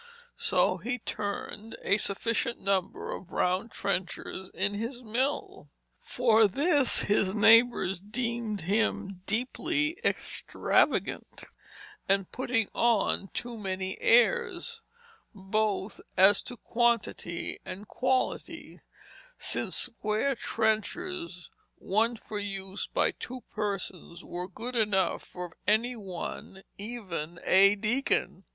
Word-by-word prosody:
So - - +2
he 245 +1 -2
turned 210 0 -5
a 200 - +3
sufficient 230 +4 0
number 195 -2 -1
of 190 - -7
round 185 +5 +1
trenchers 190 -1 -3
in 200 +2 0
his 235 +4 -4
mill. 250 +6 -2 0.3
For 225 -3 +4
this 285 - +4
his 205 -1 +2
neighbors 225 -3 +5
deemed 230 +1 -3
him 195 0 0
deeply 310 - 0
extravagant - - 0 0.7
and 195 -1 +2
putting 245 -4 0
on 225 -4 +2
too 240 +4 -5
many 190 -1 -4
airs, 465 - +3 0.5
both 205 +1 -1 0.2
as 195 +2 +6
to 245 - -7
quantity 235 -8 0
and 190 +2 -8
quality, 255 +3 -2 0.6
since - - -2
square 220 +5 0
trenchers, 230 - -2 0.2
one 225 +5 +1
for 215 -1 -6
use 195 -1 -4
by - - +2
two 255 +1 -7
persons, 195 -5 -4
were 180 +1 -5
good 235 +7 -7
enough 205 -5 +2
for 180 -2 -8
any 230 +4 +3
one, 190 -1 -7 0.2
even 190 -7 -4
a 200 +2 +6
deacon. 230 +7 0
215 Hz, 105 wpm, -29 LUFS, 195-240 Hz, 0.7 s, as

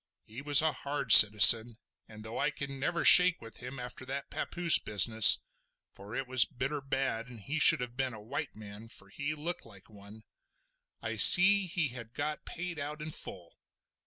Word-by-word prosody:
He 115 +5 -13
was 145 +1 +5
a 160 - -1
hard 145 +1 -7
citizen, 110 +2 +7 0.3
and 110 0 -16
though 110 - -9
I 150 - -3 0.2
never 140 +5 -6
could - - -6
shake 180 -1 +4
with 115 -1 -14
him 125 +2 -11
after 125 +1 -10
that 135 +2 -9
papoose 175 -2 0
business—for 105 -1 -1
it 135 +1 -6
was 130 -1 +3
bitter 135 +2 -8
bad, 135 -4 -5
and 120 -2 -15
he 145 +10 -8
should 165 -5 +4
have 125 -1 -10
been 130 -2 -6
a - - -14
white 140 +7 -9
man, 105 +1 -14
for 100 -3 -13
he 145 +8 -7
looked 165 +4 -8
like 100 -1 -19
one—I 110 +2 -16
see 190 - +5
he 170 -4 -4
had 120 -2 -12
got 150 +1 -7
paid 175 -2 -9
out 150 +2 -8
in 155 +1 -9
full. 90 - -10
130 Hz, 180 wpm, -27 LUFS, 110-150 Hz, 0.3 s, citizen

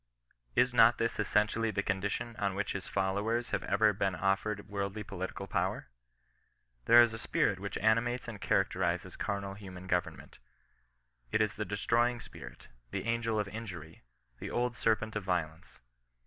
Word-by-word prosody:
Is 125 - +3
not 115 0 +6
this 115 0 -1
essentially 110 +2 +2
the 100 -1 -1
condition 100 +4 -2
on 100 -2 -1
which 105 +1 -1
his 100 -1 -4
followers 100 +5 0
have 100 - 0
ever 105 +1 +3
been 95 -1 0
offered 100 +3 0
worldly 100 +1 -3
political 95 -1 -5
power? 90 - -2 1.0
There 120 +1 +9
is 115 -1 0
a 110 - -5
spirit 100 -3 +1
which 100 +1 -4
animates 120 +3 +1
and 110 -4 -7
charac 95 0 +2
terizes 90 0 -1
carnal 100 -1 -3
human 95 -2 -10
government. 90 -2 -2 0.9
It - - +2
is 105 -1 +2
the 105 - -3
destroying 120 +4 +1
spirit - - -11
— - - -40
the - - -3
angel 115 -1 0
of 105 - -1
injury, 95 -7 -8 0.4
the - - -5
old 125 0 -1
serpent 110 -2 0
of 105 - -2
violence. 85 -4 -3
100 Hz, 160 wpm, -32 LUFS, 95-115 Hz, 1.0 s, There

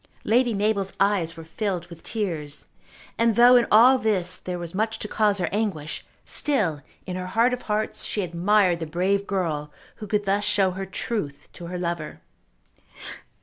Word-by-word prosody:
Lady 240 0 +2
Mabel's 200 -1 0
eyes 190 -5 +1
were 165 - -8
filled 180 +1 -3
with 170 -1 -13
tears, 165 -10 -4 0.5
and 230 -1 +3
though 245 +2 +7
in 240 -1 +4
all 250 +5 +7
this 205 -6 0
there 180 -1 -5
was 170 -1 -7
much 220 +3 -1
to 210 - -4
cause 210 -1 +2
her 180 -3 0
anguish, 195 -8 -2 0.2
still 195 - 0 0.2
in 180 - -5
her 185 0 -4
heart 230 +6 +2
of 250 - -3
hearts 210 +1 -1
she 205 - -2
admired 180 +1 +2
the 165 - -4
brave 190 +5 0
girl 160 -7 -2 0.3
who 210 - -7
could 205 0 0
thus 200 +1 +1
show 200 -2 +3
her 190 +1 -5
truth 185 -7 -4
to 175 - -9
her 180 +1 -5
lover. 170 -3 -4
195 Hz, 175 wpm, -24 LUFS, 170-215 Hz, 0.5 s, though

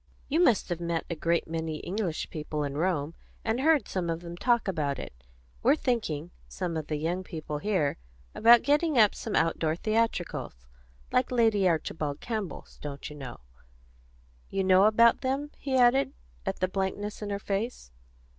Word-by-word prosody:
You 310 +4 +1
must 245 - +3
have 175 -1 -2
met 170 -1 -1
a - - -1
great 170 +2 0
many 160 -1 -3
English 180 -1 -3
people 150 -1 -3
in 140 -1 -3
Rome, 160 -2 0 0.3
and 225 +2 0
heard 310 +1 +3
some 180 -3 -2
of 165 0 -2
them 170 0 -7
talk 235 +3 +2
about 150 -7 -1
it. - - -7 0.5
We're 270 +5 +5
thinking, 180 - -2 0.2
some 175 -3 -4
of 155 -2 -3
the 155 - -1
young 170 +5 -2
people 155 -4 -5
here, 170 -6 0 0.4
about 235 +1 +7
getting 295 0 +2
up 215 -3 +6
some 225 - -4
outdoor 165 -1 +1
theatricals, 215 - -1 0.5
like 250 - +2
Lady 220 -6 +3
Archibald 155 -3 -2
Campbell's, 215 -6 -5
don't 145 0 -6
you - - -9
know. 130 - -8 1.1
You 195 0 -1
know 185 +1 +6
about 230 +2 +5
them?" 275 +3 -1
he 265 -2 0
added, 250 +2 +4 0.3
at - - -2
the 185 - +3
blankness 195 +3 -3
in 210 - -4
her 200 - -1
face. 200 - -3
185 Hz, 170 wpm, -28 LUFS, 160-230 Hz, 1.1 s, about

